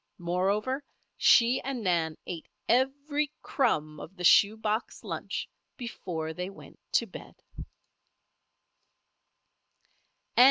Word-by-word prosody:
Moreover, 195 Hz, +10 st, 0 dB, 0.3 s
she 240 Hz, +2 st, +5 dB
and 260 Hz, -3 st, -4 dB
Nan 165 Hz, -4 st, +1 dB
ate 170 Hz, -3 st, -6 dB, 0.2 s
every 285 Hz, +4 st, +1 dB
crumb 155 Hz, -, 0 dB
of 190 Hz, -, -10 dB
the 180 Hz, -, -7 dB
shoe 205 Hz, +4 st, +6 dB
box 220 Hz, +1 st, -2 dB
lunch -, -, -4 dB, 0.3 s
before 170 Hz, -, -4 dB
they 180 Hz, +2 st, -4 dB
went 195 Hz, -, -14 dB
to -, -, +4 dB
bed! -, -, -11 dB
205 Hz, 95 wpm, -29 LUFS, 175-260 Hz, 0.3 s, shoe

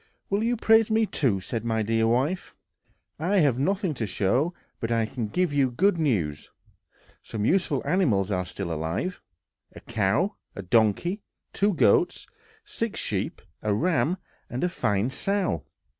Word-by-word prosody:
"Will 200 Hz, +2 st, +1 dB
you 240 Hz, +1 st, +1 dB
praise 225 Hz, 0 st, +4 dB
me, 220 Hz, 0 st, +3 dB
too?" 125 Hz, -, 0 dB
said 115 Hz, +4 st, -4 dB
my 110 Hz, -1 st, 0 dB
dear 115 Hz, +1 st, +1 dB
wife. 135 Hz, +10 st, 0 dB, 0.6 s
"I 180 Hz, +6 st, 0 dB
have 135 Hz, -5 st, +2 dB
nothing 190 Hz, +3 st, 0 dB
to 115 Hz, -5 st, -3 dB
show, 120 Hz, -, +1 dB, 0.3 s
but 115 Hz, -, -3 dB
I 115 Hz, -1 st, +2 dB
can 110 Hz, 0 st, -4 dB
give 180 Hz, +7 st, 0 dB
you 140 Hz, -2 st, +3 dB
good 175 Hz, +8 st, +2 dB
news. 90 Hz, -, 0 dB, 0.7 s
Some 105 Hz, -2 st, -4 dB
useful 190 Hz, +7 st, +2 dB
animals 105 Hz, -, +2 dB
are 90 Hz, -1 st, 0 dB
still 85 Hz, -2 st, -4 dB
alive; 80 Hz, -, -3 dB, 0.5 s
a -, -, -8 dB
cow, 115 Hz, -, 0 dB, 0.2 s
a 100 Hz, -, -6 dB
donkey, 115 Hz, -, +2 dB, 0.3 s
two 205 Hz, -1 st, +2 dB
goats, 100 Hz, -, +3 dB, 0.4 s
six -, -, -3 dB
sheep, -, -, -3 dB, 0.2 s
a 105 Hz, -1 st, +1 dB
ram 175 Hz, -, +1 dB, 0.3 s
and 125 Hz, -, -3 dB
a 180 Hz, -, +2 dB
fine 110 Hz, -, 0 dB
sow. 190 Hz, -, -1 dB
130 Hz, 155 wpm, -26 LUFS, -, 0.7 s, praise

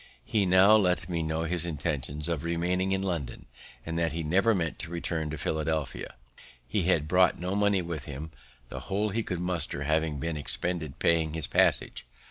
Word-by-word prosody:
He 105 Hz, -4 st, +1 dB
now 95 Hz, +4 st, +6 dB
let 90 Hz, -3 st, +1 dB
me 85 Hz, -2 st, -1 dB
know 80 Hz, +1 st, -2 dB
his 85 Hz, 0 st, 0 dB
intentions 75 Hz, -2 st, -2 dB
of 85 Hz, -3 st, -2 dB
remaining 90 Hz, +3 st, 0 dB
in 95 Hz, 0 st, 0 dB
London, 85 Hz, -9 st, -4 dB, 0.4 s
and 80 Hz, +1 st, -3 dB
that 85 Hz, -2 st, 0 dB
he 85 Hz, 0 st, -3 dB
never 95 Hz, +8 st, +3 dB
meant 80 Hz, -4 st, -2 dB
to 85 Hz, -, -6 dB
return 85 Hz, -2 st, -3 dB
to 75 Hz, -, -5 dB
Philadelphia. 80 Hz, -3 st, -3 dB, 0.5 s
He 90 Hz, +7 st, -1 dB
had 80 Hz, -5 st, +2 dB
brought 90 Hz, +2 st, +4 dB
no 90 Hz, +2 st, -3 dB
money 100 Hz, -2 st, +2 dB
with 85 Hz, -4 st, -5 dB
him, 75 Hz, +3 st, -7 dB, 0.4 s
the -, -, -6 dB
whole 105 Hz, +2 st, 0 dB
he 110 Hz, +3 st, -1 dB
could 90 Hz, -5 st, -4 dB
muster 90 Hz, -5 st, -2 dB
having 80 Hz, 0 st, 0 dB
been 80 Hz, +3 st, -3 dB
expended 85 Hz, +2 st, 0 dB
in -, -, -27 dB
paying 80 Hz, -2 st, +2 dB
his 80 Hz, -2 st, -2 dB
passage. -, -, +3 dB
85 Hz, 190 wpm, -28 LUFS, 80-90 Hz, 0.5 s, now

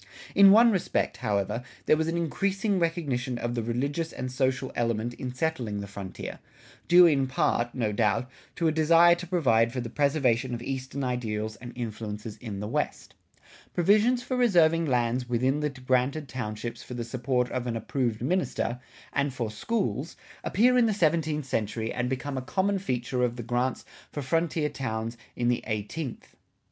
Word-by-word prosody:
In 200 Hz, 0 st, +8 dB
one 230 Hz, +4 st, +7 dB
respect, 185 Hz, -, 0 dB
however, 105 Hz, -1 st, -1 dB, 0.2 s
there -, -, +5 dB
was 160 Hz, +1 st, 0 dB
an 165 Hz, +1 st, -1 dB
increasing 195 Hz, +4 st, 0 dB
recognition 140 Hz, -8 st, -1 dB
of 120 Hz, 0 st, -2 dB
the 120 Hz, -, -1 dB
religious 140 Hz, +8 st, -2 dB
and 130 Hz, 0 st, -5 dB
social 130 Hz, 0 st, 0 dB
element 115 Hz, 0 st, -1 dB
in 125 Hz, +1 st, -5 dB
settling 125 Hz, -7 st, -2 dB
the 100 Hz, -, -4 dB
frontier, 100 Hz, -2 st, -7 dB, 0.5 s
due 175 Hz, +1 st, +8 dB
in 140 Hz, -5 st, +3 dB
part, 120 Hz, -2 st, 0 dB
no 115 Hz, -5 st, 0 dB
doubt, 110 Hz, +3 st, +1 dB, 0.3 s
to 165 Hz, -, +1 dB
a -, -, +3 dB
desire 165 Hz, +2 st, +6 dB
to 175 Hz, +1 st, -4 dB
provide 120 Hz, -10 st, +3 dB
for 125 Hz, -, -3 dB
the 120 Hz, -2 st, -5 dB
preservation 130 Hz, -4 st, +1 dB
of 115 Hz, -, -7 dB
eastern 135 Hz, +1 st, -4 dB
ideals 110 Hz, -4 st, -2 dB
and 120 Hz, -1 st, -9 dB
influences 110 Hz, -2 st, -5 dB
in 105 Hz, -5 st, -6 dB
the 105 Hz, -, -3 dB
West. -, -, -3 dB, 0.6 s
Provisions 215 Hz, +8 st, +4 dB
for 255 Hz, -, -2 dB
reserving 170 Hz, -9 st, +4 dB
lands 125 Hz, -1 st, 0 dB
within 130 Hz, +4 st, +1 dB
the 150 Hz, 0 st, 0 dB
granted 130 Hz, +2 st, 0 dB
townships 115 Hz, -1 st, -5 dB
for 125 Hz, -, -8 dB
the 120 Hz, -, -3 dB
support 125 Hz, +1 st, -1 dB
of 125 Hz, -1 st, -2 dB
an 115 Hz, -1 st, -1 dB
approved 120 Hz, -2 st, -2 dB
minister, 135 Hz, -6 st, -1 dB, 0.3 s
and 140 Hz, 0 st, +1 dB
for 120 Hz, -4 st, -3 dB
schools, 170 Hz, -, -2 dB, 0.3 s
appear 250 Hz, +5 st, +4 dB
in 235 Hz, -, +4 dB
the 215 Hz, -, 0 dB
seventeenth 155 Hz, -4 st, +1 dB
century 110 Hz, -2 st, -2 dB
and 125 Hz, 0 st, -1 dB
become 135 Hz, +1 st, -3 dB
a -, -, -5 dB
common 195 Hz, +8 st, 0 dB
feature 125 Hz, -7 st, -2 dB
of 120 Hz, -1 st, 0 dB
the 120 Hz, -, -6 dB
grants 125 Hz, +3 st, -1 dB, 0.3 s
for 145 Hz, -, -4 dB
frontier 160 Hz, +2 st, +1 dB
towns 115 Hz, -5 st, -3 dB, 0.2 s
in 120 Hz, -, 0 dB
the 120 Hz, 0 st, +1 dB
eighteenth. 110 Hz, +6 st, -4 dB
130 Hz, 175 wpm, -27 LUFS, 120-160 Hz, 0.6 s, In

